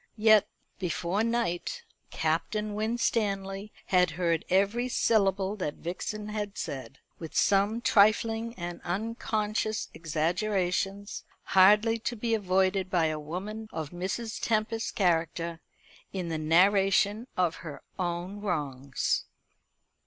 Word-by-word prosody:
Yet, 215 -1 +6 0.3
before 180 +2 -1
night, 235 - -1 0.3
Captain 175 +7 -1
Winstanley 210 -2 -1
had 180 -2 +3
heard 170 -2 +1
every 200 +7 +2
syllable 200 -4 +2
that 150 -7 -3
Vixen 210 +5 -5
had 210 -1 -4
said; 135 -4 -5 0.2
with 165 -2 -8
some 205 +4 +3
trifling 225 +2 +3
and 175 -1 -6
unconscious 215 +2 -2
exaggerations, 185 +5 -1 0.2
hardly 210 +4 +5
to 240 +2 -3
be 230 +1 -1
avoided 190 -2 +1
by 175 -3 +2
a 155 - -4
woman 200 +8 -6
of 160 -3 -5
Mrs. 195 +6 -4
Tempest's 225 0 0
character, 170 -2 0 0.5
in 180 -3 -3
the 160 -1 -2
narration 195 +6 +3
of 180 -3 +1
her 155 -4 -9 0.2
own 180 +3 -3
wrongs. 140 -8 -1
195 Hz, 110 wpm, -29 LUFS, 175-215 Hz, 0.5 s, Yet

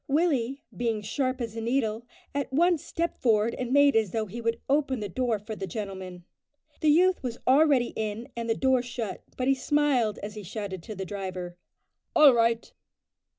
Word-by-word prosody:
Willie, 275 -4 +1
being 230 -3 -1
sharp 255 +4 -1
as 230 -2 -4
a 225 - -4
needle, 230 -1 -1 0.3
at 280 -1 -2
once 335 +3 +3
stepped 340 +1 -3
forward 225 -1 +2
and 250 -1 -4
made 285 -1 +5
as 220 -3 +3
though 220 +4 -1
he 220 +4 -7
would 230 0 -1
open 275 -2 +1
the 210 - -3
door 235 +3 0
for 215 +2 -7
the 195 -2 -5
gentleman. 185 -2 -6 0.5
The 310 - +3
youth 365 +5 +4
was 245 -2 -4
already 270 -2 +4
in 220 +2 -3
and 230 -1 -4
the 225 - +2
door 260 0 +2
shut, 240 -3 -5 0.2
but 255 - -1
he 270 - +5
smiled 270 -5 +1
as 205 +1 -5
he 210 - -7
shouted 195 -1 -5
to 215 +5 -8
the 190 0 -4
driver, 185 -2 -5 0.6
"All 295 -3 +8
right!" 230 0 +1
235 Hz, 190 wpm, -27 LUFS, 210-270 Hz, 0.6 s, All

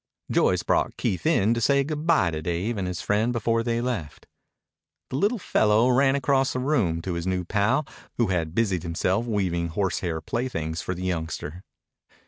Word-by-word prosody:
Joyce - - +2
brought - - 0
Keith 95 - -1
in 115 -9 +3
to 115 - -2
say 140 +5 +3
good 150 +2 -4
bye 155 - +4
to 80 -1 -4
Dave 90 +8 -2
and 95 -3 -2
his 90 -1 -4
friend 105 +4 +1
before 115 -1 +1
they 115 0 -1
left. 115 - -4 0.9
The - - -2
little 210 - +2
fellow 110 - +3
ran 135 +2 +4
across 135 -1 +2
the 130 - -2
room 115 - 0
to 90 - -3
his 85 +1 -3
new 90 -1 -1
pal, 110 - +1 0.3
who 115 -4 +2
had 85 -3 -1
busied 95 -7 +1
himself 90 +6 -1
weaving 90 -6 0
horsehair 90 -1 -1
playthings 80 -9 -3
for 95 - -3
the 90 - -6
youngster. 85 -1 -3
105 Hz, 180 wpm, -25 LUFS, 85-125 Hz, 0.9 s, bye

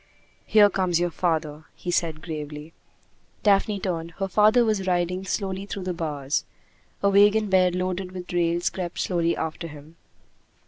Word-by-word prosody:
"Here 210 -1 +7
comes 185 -4 0
your 175 0 0
father," 160 -2 -2
he 175 - -4
said 160 -3 -1
gravely. 150 -1 -7 0.7
Daphne 205 0 +3
turned. 170 -3 -3
Her 195 - -1
father 215 +5 +4
was 205 -4 0
riding 180 +1 0
slowly 195 0 -3
through 195 -1 -5
the 180 0 -2
bars. 150 -4 -2 0.6
A 200 - +5
wagon 205 +1 +4
bed 185 -1 +4
loaded 185 0 -2
with 180 -1 -8
rails 175 0 +1
crept 175 -2 -5
slowly 170 -2 0
after 160 +1 -4
him. 150 +1 -13
180 Hz, 150 wpm, -25 LUFS, 165-195 Hz, 0.7 s, Here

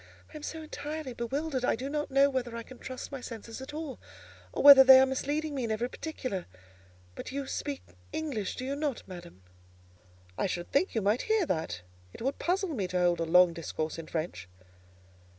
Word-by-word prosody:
"I - - -13
am - - -9
so 320 +2 -5
entirely 300 -2 -5
bewildered, 265 +3 -2
I - - +2
do 255 +4 -5
not 295 +1 -2
know 275 +1 +5
whether 250 -4 -2
I 230 - -5
can 255 +1 -13
trust 255 +2 -7
my 275 -2 -6
senses 230 0 -8
at 265 - -7
all, 300 -4 -6 0.5
or - - -2
whether 280 -2 +11
they 265 0 +10
are 265 - +6
misleading 290 +3 -2
me 265 -3 -2
in 230 - -2
every 225 +3 -1
particular: 255 - -5 0.7
but - - -7
you 280 +1 -3
speak 280 +1 -4 0.3
English, 275 -11 -3
do 255 - -5
you 275 +1 -2
not, 290 -4 -3
madam?" 175 - -11 1.0
"I - - +2
should 175 -1 -4
think 315 +4 +1
you 220 - +1
might 210 +5 +2
hear 435 -4 +3
that: 90 - -2 0.3
it - - -8
would 270 +2 -1
puzzle 380 +2 0
me 200 -8 -1
to 180 0 -2
hold 175 -1 +3
a 165 - 0
long 175 +1 +6
discourse 160 -1 -4
in 160 - -8
French." 155 - -4
260 Hz, 205 wpm, -30 LUFS, 190-290 Hz, 1.0 s, whether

